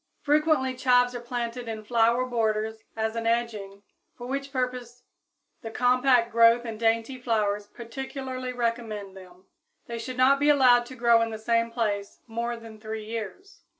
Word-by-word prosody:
Frequently 300 -3 +2
chives 250 -1 +3
are 245 - -4
planted 240 0 -4
in 220 -1 -5
flower 235 +2 +2
borders 220 -2 -1 0.2
as 220 0 -1
an 230 0 -2
edging, 215 -4 -2 0.3
for 245 - -8
which 275 +2 -4
purpose 250 -2 -4 0.6
the 225 - -6
compact 250 0 +3
growth 230 +1 +5
and 225 -2 -6
dainty 230 +3 0
flowers 210 -4 0
particularly 255 +2 -6
recommend 230 -5 -3
them. 185 -1 -15 0.4
They 235 -1 -6
should 255 +2 -6
not 265 +2 +5
be 290 +1 +3
allowed 250 -4 +5
to 260 - -10
grow 235 -1 +4
in 230 - 0
the 220 - -5
same 230 +1 +1
place 210 -4 -3
more 235 +1 -3
than 225 -1 -12
three 220 0 -6
years. 230 - -7
235 Hz, 160 wpm, -26 LUFS, 220-250 Hz, 0.6 s, growth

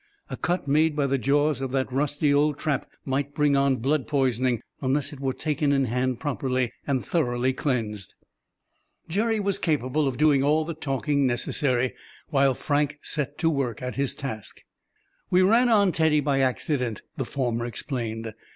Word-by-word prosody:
A - - -2
cut 175 -4 -2
made 155 +2 +3
by 145 -2 +1
the 135 0 0
jaws 145 +1 +2
of 135 - -2
that 130 -1 -1
rusty 145 +1 +1
old 145 0 +2
trap 145 -4 -2 0.2
might 140 +1 -2
bring 145 -1 +3
on 140 -1 +3
blood 135 +1 0
poisoning, 130 -3 +1 0.2
unless 140 +2 0
it 140 - -10
were 135 -1 -1
taken 150 +1 0
in 135 -1 +2
hand 125 +1 -1
properly, 130 -4 -1 0.2
and 135 -3 0
thoroughly 130 -5 0
cleansed. 110 - -3 0.9
Jerry 220 +6 0
was 200 -1 0
capable 150 -2 0
of 130 -2 -2
doing 150 -2 +4
all 155 +3 +2
the 170 - -4
talking 140 -1 0
necessary, 125 +1 0 0.4
while 135 -3 +3
Frank 145 +1 0
set 145 -1 -2
to 165 - +2
work 130 -5 -2
at 125 - -3
his 140 -1 -1
task. 130 -7 -6 0.7
"We 180 +1 +4
ran 235 +6 +4
on 205 -4 +4
Teddy 160 -2 +3
by 140 -1 +1
accident," 130 -3 -1
the 135 - -2
former 120 -3 -2
explained. 115 -2 -4
140 Hz, 170 wpm, -25 LUFS, 130-150 Hz, 0.9 s, doing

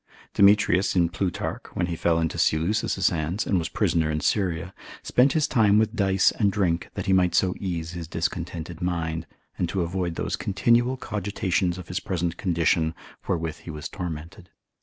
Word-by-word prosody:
Demetrius 100 -1 +4
in 85 -2 +3
Plutarch, 90 -1 -3
when 90 - +1
he 85 -1 -3
fell 85 0 +1
into 80 -1 -1
Seleucus's 95 +4 +2
hands, 85 +5 -2
and 95 - +1
was 80 - -3
prisoner 80 -2 +1
in 75 0 -1
Syria, 90 -1 -1 0.3
spent 130 +3 +3
his 155 -2 +2
time 105 -6 +4
with 110 +1 +2
dice 95 -3 +3
and 100 -3 +1
drink 90 -5 0
that - - -3
he 95 - +2
might 90 -2 +3
so 90 0 +3
ease 85 -4 -3
his 85 -2 -6
discontented 85 0 -4
mind, 85 -2 -2 0.3
and 85 - 0
avoid 90 -1 -1
those - - -2
continual 120 +5 +2
cogitations 95 -5 -1
of 90 -1 -9
his 90 +1 -2
present 85 -2 -2
condition 80 -2 +1 0.3
wherewith 80 -3 -2
he - - -11
was 75 -1 -5
tormented. 85 0 -7
90 Hz, 170 wpm, -25 LUFS, 85-100 Hz, 0.3 s, Demetrius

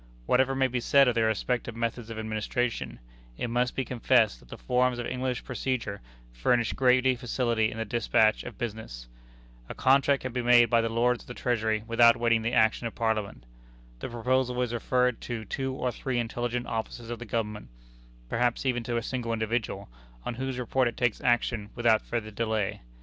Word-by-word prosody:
Whatever 130 - +2
may 135 0 +2
be 125 -1 -1
said 140 +3 +5
of 125 - +3
the 115 - +1
respective 115 +2 -1
methods 115 0 -3
of 115 - -6
administration, 110 +2 -2 0.4
it 120 - -3
must 125 +1 0
be 130 - -1
confessed 120 -3 +2
that - - -20
the - - -8
forms 125 - +1
of 120 - -3
English 130 -1 -2
procedure 125 -5 -3 0.3
furnish 115 - +1
greater 130 0 +3
facility 120 -3 0
in - - -8
the 115 - -2
despatch 110 0 +2
of - - -9
business. 110 - -6 0.6
A - - -6
contract 135 +1 +3
can 130 -2 -4
be 125 - -1
made 120 -1 +5
by 115 -1 +5
the 115 - -1
Lords 120 +1 +1
of - - -22
the 125 - -8
Treasury 110 -3 0
without 115 +1 +5
waiting 115 -1 +2
the 115 +1 -1
action 115 +1 +3
of - - -9
Parliament. 110 - -2 0.6
The - - -5
proposal 125 +1 0
is 120 -1 -3
referred 125 0 +1
to 115 -3 -5
two 135 +5 -3
or 125 -1 -1
three 130 0 -3
intelligent 120 +1 -2
officers 115 +1 -5
of 120 - -5
the 120 - -7
Government 105 -1 -3 0.6
perhaps 120 - 0
even 125 -2 +1
to 120 0 -1
a 115 - -2
single 120 -1 -3
individual 110 0 -2 0.4
on - - -2
whose 130 +1 -4
report 125 +1 +1
it 120 - -4
takes 120 -4 0
action 120 -3 +1
without 115 -2 +3
further 110 -2 -4
delay. 110 -2 -2
120 Hz, 190 wpm, -28 LUFS, 110-125 Hz, 0.6 s, said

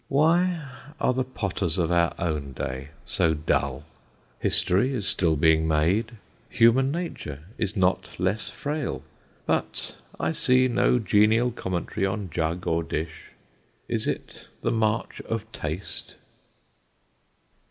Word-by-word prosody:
Why 165 +2 +2 0.3
are - - +2
the 130 +1 0
potters 100 -9 -2
of 85 -2 +1
our 85 -1 +3
own 75 -5 -2
day 65 +2 -4 0.2
so 80 -1 +2
dull? 70 -2 0 0.6
History 120 +9 +2
is 105 -6 -2
still 85 -4 +3
being 80 +1 +4
made, 85 +10 +2 0.4
human 120 +4 +4
nature 150 - -5 0.2
is 105 0 -1
not 95 0 +2
less 95 +4 0
frail; 150 -1 -3 0.4
but - - -1 0.2
I - - +1
see 130 0 +4
no 125 0 +3
genial 110 +3 +3
commentary 95 -2 -2
on 95 -2 -3
jug 80 +2 -1
or 85 0 +1
dish. 80 0 -5 0.6
Is - - -1
it - - -5
the - - 0
march 110 0 0
of 115 -1 -3
Taste? 80 0 -5
95 Hz, 125 wpm, -26 LUFS, 80-120 Hz, 0.6 s, being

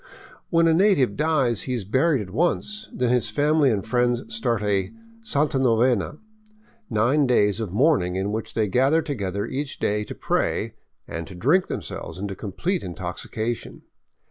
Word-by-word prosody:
When 165 -1 +4
a 165 - +4
native 165 - +3
dies 140 -8 +1
he 125 - 0
is 110 -6 -4
buried 130 - +2
at 95 - -11
once, 210 - -1
then 125 -1 0
his 125 -4 +1
family 145 +4 +3
and 105 -5 -1
friends 120 +1 +1
start 115 -2 0
a 100 -2 0 0.2
" 230 0 -25
santa 140 -1 +1
novena," 125 +1 +2 0.4
— 215 - -32 0.3
nine 130 +7 +2
days 105 -4 +3
of 110 -6 -3
mourning 105 - +2
In 95 +2 -1
which 110 +1 -4
they 110 -2 +1
gather 135 - +3
together 100 - -3
each 140 +1 -4
day 105 +1 0
to - - -8
pray - - -1 0.3
and 85 0 -5
to 95 - -10
drink 150 - +2
themselves - - -6
into 100 +1 -4
complete 110 - -2
intoxication. 95 +6 -5
120 Hz, 170 wpm, -24 LUFS, 105-150 Hz, 0.4 s, When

